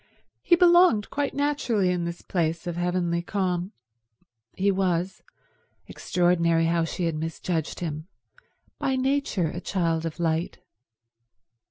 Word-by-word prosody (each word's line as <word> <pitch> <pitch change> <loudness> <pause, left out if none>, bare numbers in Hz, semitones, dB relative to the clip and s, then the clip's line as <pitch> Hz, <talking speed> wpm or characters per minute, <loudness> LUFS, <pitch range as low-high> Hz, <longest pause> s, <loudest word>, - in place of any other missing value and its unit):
He 345 - +4
belonged 345 - +5
quite 285 0 -2
naturally 275 -10 +1
in 175 -1 -1
this 170 0 -6
place 165 -1 -1
of 175 -1 -3
heavenly 175 -1 0
calm. 180 0 -2 0.8
He 200 +1 +2
was—extraordinary 175 -2 -1
how 165 0 +1
she 170 +3 -4
had 165 - 0
misjudged 160 +1 -3
him—by 165 - -6
nature 260 - 0
a 175 - -6
child 165 -4 -1
of 165 - -8
light. 165 0 -1
175 Hz, 115 wpm, -25 LUFS, 165-200 Hz, 0.8 s, belonged